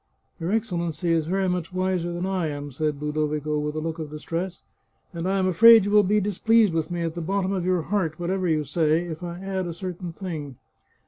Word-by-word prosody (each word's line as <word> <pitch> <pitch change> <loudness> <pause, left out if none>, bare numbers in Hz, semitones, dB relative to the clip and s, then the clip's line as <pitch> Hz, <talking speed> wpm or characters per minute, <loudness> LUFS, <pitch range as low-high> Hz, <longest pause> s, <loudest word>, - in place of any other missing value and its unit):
" - - -45
Your 165 +3 -2
Excellency 170 -6 -1
is 160 -2 +1
very 190 +2 +1
much 180 -1 -2
wiser 185 -2 -1
than 175 +1 -3
I 190 -3 -1
am," 145 -1 -5
said 150 +2 -2
Ludovico, 150 0 -1
with 150 0 -3
a - - -1
look 160 +1 -4
of 155 -2 -5
distress, 170 +4 -5 0.3
" - - -42
and 170 +1 -3
I 195 - +1
am 190 - +1
afraid 225 +3 +8
you 205 - -1
will 210 0 +7
be 205 +2 +2
displeased 210 0 +3
with 160 -1 -1
me 175 -1 -2
at 165 -1 -2
the 170 - -5
bottom 190 +3 -1
of 185 -3 -1
your 180 -2 +1
heart, 170 -4 -1
what 175 +1 -2
ever 190 -1 0
you 160 -2 +2
may 150 - -1
say, 155 +3 +1
if 170 -1 -6
I 175 -1 -5
add 190 -1 -3
a 170 - -5
certain 180 -1 -5
thing." 160 -6 -6
175 Hz, 245 wpm, -25 LUFS, 155-190 Hz, 0.3 s, afraid